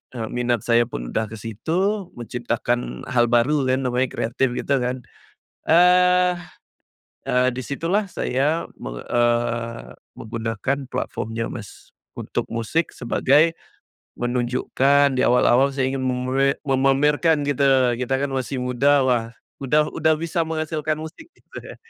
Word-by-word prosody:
eee, 110 Hz, -2 st, -4 dB
minat 120 Hz, -3 st, 0 dB
saya 120 Hz, 0 st, +4 dB
pun -, -, -6 dB
udah 110 Hz, -, 0 dB
ke 110 Hz, -, -9 dB
situ, 175 Hz, -, -2 dB
menciptakan 120 Hz, 0 st, -3 dB
hal 120 Hz, -1 st, +4 dB
baru 130 Hz, +4 st, +2 dB
kan 130 Hz, +1 st, +1 dB
namanya 125 Hz, +1 st, +1 dB
kreatif, 120 Hz, +2 st, -1 dB
gitu 140 Hz, +1 st, 0 dB
kan. 125 Hz, 0 st, -3 dB, 0.6 s
Eee 180 Hz, +1 st, +5 dB, 0.9 s
eee, 125 Hz, 0 st, +3 dB
di 130 Hz, -, -4 dB
situlah 170 Hz, -, -1 dB
saya, 145 Hz, +5 st, -1 dB
meng -, -, -6 dB
eee, 120 Hz, -, -1 dB, 0.2 s
menggunakan 115 Hz, +4 st, -3 dB
platform-nya 115 Hz, -2 st, -3 dB
Mas, 110 Hz, -4 st, -11 dB, 0.3 s
untuk -, -, -3 dB
musik 115 Hz, +9 st, -1 dB
sebagai 145 Hz, +6 st, +2 dB, 0.6 s
menunjukkan 130 Hz, +3 st, +1 dB
di -, -, +2 dB
awal-awal 125 Hz, +2 st, +4 dB
saya 130 Hz, -1 st, 0 dB
ingin 135 Hz, -, -2 dB
memre 130 Hz, +2 st, 0 dB
memamerkan 145 Hz, +4 st, +2 dB
gitu, 140 Hz, 0 st, 0 dB, 0.3 s
kita 125 Hz, +1 st, -2 dB
kan 140 Hz, -, -1 dB
masih 130 Hz, 0 st, -3 dB
muda, 135 Hz, +3 st, +2 dB
wah, 115 Hz, -2 st, 0 dB, 0.3 s
udah 150 Hz, +3 st, +2 dB
udah 160 Hz, 0 st, +2 dB
bisa 165 Hz, +1 st, -1 dB
menghasilkan 155 Hz, -1 st, -2 dB
musik, 160 Hz, -, -10 dB
gitu -, -, -15 dB
ya -, -, -10 dB
130 Hz, 130 wpm, -22 LUFS, 120-150 Hz, 0.9 s, Eee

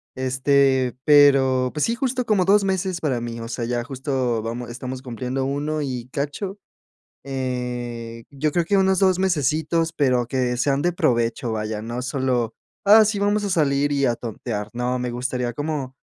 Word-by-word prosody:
este, 130 Hz, 0 st, +2 dB
pero, 135 Hz, -3 st, +5 dB
pues 150 Hz, -, +1 dB
sí, 230 Hz, -, 0 dB
justo 250 Hz, 0 st, -1 dB
como 205 Hz, -5 st, +2 dB
2 200 Hz, +2 st, +4 dB
meses 190 Hz, -2 st, -1 dB
para 135 Hz, -6 st, 0 dB
mí, 115 Hz, 0 st, -5 dB
o 115 Hz, -, -6 dB
sea, 115 Hz, 0 st, -3 dB
ya 120 Hz, 0 st, -1 dB
justo 130 Hz, -3 st, -2 dB
vamos 120 Hz, +2 st, -5 dB
estamos 125 Hz, +2 st, -6 dB
cumpliendo 130 Hz, +1 st, -3 dB
1 145 Hz, +3 st, -2 dB
y 125 Hz, -4 st, -4 dB
cacho, 155 Hz, +9 st, -4 dB, 0.7 s
eh, 125 Hz, -3 st, -4 dB
yo 145 Hz, +1 st, -2 dB
creo 175 Hz, -, +2 dB
que 200 Hz, +4 st, +1 dB
unos 190 Hz, -1 st, +3 dB
2 185 Hz, -2 st, +3 dB
mesecitos, 160 Hz, -1 st, +1 dB
pero 130 Hz, -6 st, +1 dB
que 125 Hz, -1 st, 0 dB
sean 135 Hz, +2 st, +1 dB
de 175 Hz, +2 st, +1 dB
provecho, 120 Hz, -5 st, 0 dB
vaya, 110 Hz, -1 st, -3 dB
no 120 Hz, +3 st, -4 dB
solo, 130 Hz, -3 st, -1 dB, 0.3 s
ah, 215 Hz, +2 st, +8 dB
sí 210 Hz, -1 st, 0 dB
vamos 205 Hz, +1 st, +1 dB
a 200 Hz, -, -1 dB
salir 145 Hz, -4 st, +2 dB
y 140 Hz, -1 st, +2 dB
a 120 Hz, -2 st, +1 dB
tontear, 110 Hz, -2 st, -5 dB
no, 125 Hz, +1 st, -1 dB
me 125 Hz, -1 st, -3 dB
gustaría 125 Hz, 0 st, -2 dB
como, 140 Hz, 0 st, -4 dB
130 Hz, 175 wpm, -23 LUFS, 120-155 Hz, 0.7 s, ah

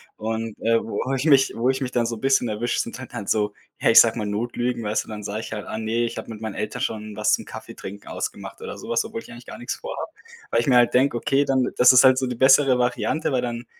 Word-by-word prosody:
Und, 110 Hz, 0 st, -4 dB
äh, 115 Hz, 0 st, +2 dB
wo 130 Hz, +4 st, -3 dB
ich 135 Hz, +2 st, -1 dB
mich 135 Hz, -4 st, +4 dB
wo 120 Hz, +3 st, +1 dB
ich 130 Hz, 0 st, 0 dB
mich 125 Hz, -, -3 dB
dann 120 Hz, -2 st, +1 dB
so 115 Hz, -1 st, -4 dB
bisschen 135 Hz, 0 st, +2 dB
erwische, 110 Hz, +3 st, -1 dB
sind 115 Hz, -, -3 dB
halt 130 Hz, -, -10 dB
dann 105 Hz, -5 st, -6 dB
so, 105 Hz, -1 st, 0 dB, 0.3 s
ja, -, -, +2 dB
ich -, -, +9 dB
sage -, -, +5 dB
mal 105 Hz, -, -2 dB
Notlügen, 120 Hz, +3 st, -2 dB
weißt 105 Hz, +1 st, -1 dB
du, -, -, -22 dB
dann 105 Hz, -1 st, -7 dB
sage 105 Hz, +2 st, -4 dB
ich 110 Hz, 0 st, -7 dB
halt: 105 Hz, -1 st, -6 dB
„Ah 110 Hz, -, -5 dB
ne, 110 Hz, +2 st, -1 dB
ich 115 Hz, -, -5 dB
habe -, -, -7 dB
mit 110 Hz, -, -9 dB
meinen 110 Hz, -2 st, -5 dB
Eltern 105 Hz, 0 st, -4 dB
schon 110 Hz, -1 st, -4 dB
was 105 Hz, +1 st, +1 dB
zum -, -, 0 dB
Kaffeetrinken 100 Hz, +2 st, -9 dB
ausgemacht“ -, -, -6 dB
oder -, -, -7 dB
sowas, 120 Hz, 0 st, -1 dB
obwohl 115 Hz, -, -6 dB
ich -, -, -14 dB
eigentlich 120 Hz, +1 st, -12 dB
gar -, -, -10 dB
nix 120 Hz, -, -4 dB
vorhabe. -, -, -6 dB, 0.4 s
Weil 115 Hz, -, +3 dB
ich -, -, -5 dB
mir 130 Hz, -, +4 dB
halt 120 Hz, -1 st, +4 dB
denke: 130 Hz, +1 st, +3 dB
„Okay, 135 Hz, +4 st, +1 dB
dann 130 Hz, -2 st, +1 dB
das 125 Hz, +1 st, +7 dB
ist 130 Hz, -, +7 dB
halt 130 Hz, -1 st, +6 dB
so 130 Hz, -, 0 dB
die 125 Hz, -, -3 dB
bessere 130 Hz, +1 st, +5 dB
Variante“, 125 Hz, +5 st, 0 dB
weil 130 Hz, -, +1 dB
dann, 120 Hz, 0 st, -4 dB
120 Hz, 275 wpm, -23 LUFS, 110-130 Hz, 0.4 s, ich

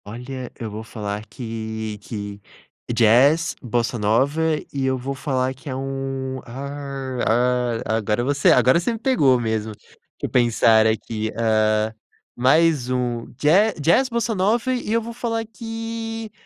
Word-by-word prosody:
Olha, 125 Hz, +4 st, -7 dB
eu 110 Hz, -2 st, -5 dB
vou 110 Hz, +2 st, -6 dB
falar 105 Hz, -2 st, -5 dB
que 110 Hz, -2 st, -5 dB
que 100 Hz, -1 st, -7 dB, 0.5 s
jazz, 125 Hz, +8 st, +4 dB
bossa 120 Hz, -1 st, -1 dB
nova, 130 Hz, +9 st, +2 dB, 0.3 s
e 140 Hz, -1 st, -2 dB
eu 130 Hz, 0 st, +1 dB
vou 130 Hz, +2 st, -4 dB
falar 130 Hz, -1 st, -1 dB
que 135 Hz, +2 st, -11 dB
é 130 Hz, -, -3 dB
um, 135 Hz, 0 st, -4 dB
ah 135 Hz, 0 st, -6 dB
ah 125 Hz, 0 st, +1 dB
ah, 110 Hz, -, 0 dB
agora 105 Hz, +2 st, 0 dB
você 140 Hz, +2 st, +2 dB
a -, -, +5 dB
agora 125 Hz, +6 st, +5 dB
você 180 Hz, +7 st, -1 dB
me -, -, -4 dB
pegou 145 Hz, -, +3 dB
mesmo. 110 Hz, -2 st, -2 dB
Deixa -, -, -25 dB, 0.3 s
eu -, -, -1 dB
pensar 115 Hz, -2 st, +4 dB
aqui, 110 Hz, 0 st, -2 dB
ah, 110 Hz, -1 st, +2 dB, 0.4 s
mais 140 Hz, +1 st, +3 dB
um 125 Hz, -2 st, -1 dB
ja 195 Hz, +9 st, +4 dB
jazz, 170 Hz, -, +3 dB
bossa 235 Hz, -1 st, -1 dB
nova, 225 Hz, +6 st, +1 dB
e 245 Hz, -4 st, -3 dB
eu 230 Hz, 0 st, +2 dB
vou 235 Hz, +1 st, -7 dB
falar 230 Hz, -1 st, -2 dB
que 225 Hz, 0 st, -6 dB
130 Hz, 155 wpm, -22 LUFS, 115-160 Hz, 0.5 s, a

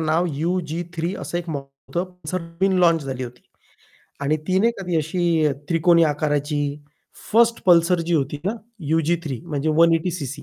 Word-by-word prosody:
नाव 160 Hz, +2 st, +1 dB
यु-जी-3 170 Hz, +1 st, -2 dB
असं 175 Hz, -, -3 dB
एक 175 Hz, -1 st, -7 dB
मॉडेल 140 Hz, -2 st, -9 dB
होतं, 185 Hz, +1 st, -3 dB
असं 185 Hz, +4 st, -2 dB
नवीन 170 Hz, +4 st, 0 dB
लॉन्च 165 Hz, -3 st, +4 dB
झाली 130 Hz, -2 st, -4 dB
होती 125 Hz, 0 st, -11 dB, 0.8 s
आणि 140 Hz, +2 st, +1 dB
ती 185 Hz, 0 st, +2 dB
नाही 230 Hz, +4 st, +3 dB
का 195 Hz, -, -6 dB
ती 175 Hz, -2 st, 0 dB
अशी 165 Hz, +1 st, +1 dB
अ, 145 Hz, -, +2 dB, 0.2 s
त्रिकोणी 170 Hz, 0 st, +4 dB
आकाराची 150 Hz, -1 st, 0 dB, 0.7 s
1st 235 Hz, +1 st, +4 dB
पल्सर 175 Hz, 0 st, +5 dB
जी 175 Hz, -, +1 dB
होती 145 Hz, -1 st, 0 dB
ना 200 Hz, -, +1 dB, 0.4 s
यु-जी-3, 160 Hz, -4 st, 0 dB
म्हणजे 150 Hz, -2 st, -2 dB
180 165 Hz, +1 st, +4 dB
सीसी. 145 Hz, -6 st, -5 dB
165 Hz, 165 wpm, -22 LUFS, 150-175 Hz, 0.8 s, पल्सर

